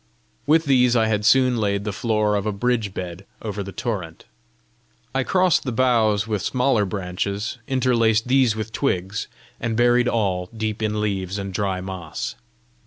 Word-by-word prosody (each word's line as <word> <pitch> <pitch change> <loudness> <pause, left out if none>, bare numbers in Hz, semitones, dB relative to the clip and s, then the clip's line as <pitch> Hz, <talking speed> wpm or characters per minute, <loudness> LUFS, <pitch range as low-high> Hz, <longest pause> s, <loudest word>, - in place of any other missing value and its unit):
With 160 +2 +4
these 125 -3 +4
I 115 -2 +4
had 105 -1 0
soon 125 +1 +4
laid 100 -2 0
the 105 -1 -3
floor 110 0 +1
of 100 0 0
a - - +1
bridge 110 0 0
bed 90 0 -6 0.2
over 105 -2 -4
the 100 0 -6
torrent. 95 -8 -4 0.9
I 135 0 +1
crossed 185 +2 +2
the 130 - -2
boughs 115 -4 +2
with 105 -3 -2
smaller 125 -1 +1
branches, 100 +4 -3
interlaced 115 -4 +2
these 130 -3 +3
with 110 0 -4
twigs, 100 -6 -1 0.3
and 115 -1 -2
buried 120 0 +4
all 95 -6 0
deep 110 0 -3
in 105 -1 -1
leaves 100 -2 -2
and 100 -1 -5
dry 95 -1 -1
moss. 90 -4 -5
110 Hz, 165 wpm, -22 LUFS, 100-120 Hz, 0.9 s, With